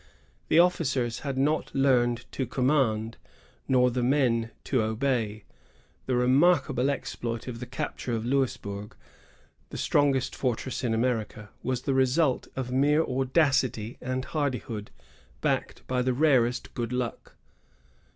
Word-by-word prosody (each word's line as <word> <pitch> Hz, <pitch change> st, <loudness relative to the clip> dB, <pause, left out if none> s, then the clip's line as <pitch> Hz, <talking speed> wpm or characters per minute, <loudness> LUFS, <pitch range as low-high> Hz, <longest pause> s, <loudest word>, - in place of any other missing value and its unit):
The -, -, +3 dB
officers 140 Hz, -9 st, +2 dB
had 135 Hz, -2 st, -4 dB
not 150 Hz, +4 st, 0 dB
learned 120 Hz, -3 st, +2 dB
to 130 Hz, -, -3 dB
command, 125 Hz, -4 st, +1 dB, 0.5 s
nor 125 Hz, -1 st, +4 dB
the 125 Hz, +1 st, -1 dB
men 120 Hz, -3 st, +2 dB
to 130 Hz, -4 st, +1 dB
obey. 110 Hz, -2 st, -1 dB, 0.6 s
The 130 Hz, -, +1 dB
remarkable 135 Hz, +1 st, +3 dB
exploit 120 Hz, -4 st, -4 dB
of 120 Hz, -2 st, -5 dB
the 125 Hz, -, -6 dB
capture 130 Hz, -1 st, -4 dB
of 110 Hz, 0 st, -3 dB
Louisburg, 105 Hz, -6 st, -2 dB, 0.7 s
the -, -, -7 dB
strongest 140 Hz, -3 st, +1 dB
fortress 130 Hz, 0 st, -2 dB
in 115 Hz, -2 st, +1 dB
America, 110 Hz, -3 st, -2 dB
was 130 Hz, -1 st, -2 dB
the 135 Hz, -, 0 dB
result 130 Hz, +2 st, +2 dB
of 130 Hz, -2 st, -4 dB
mere 145 Hz, +4 st, +3 dB
audacity 130 Hz, -4 st, +1 dB
and 130 Hz, +1 st, -3 dB
hardihood, 125 Hz, -8 st, -3 dB, 0.5 s
backed -, -, -2 dB
by 125 Hz, -1 st, 0 dB
the 130 Hz, 0 st, +1 dB
rarest 130 Hz, -4 st, +2 dB
good 120 Hz, -1 st, -3 dB
luck. 125 Hz, -2 st, -4 dB
125 Hz, 130 wpm, -27 LUFS, 120-135 Hz, 0.7 s, nor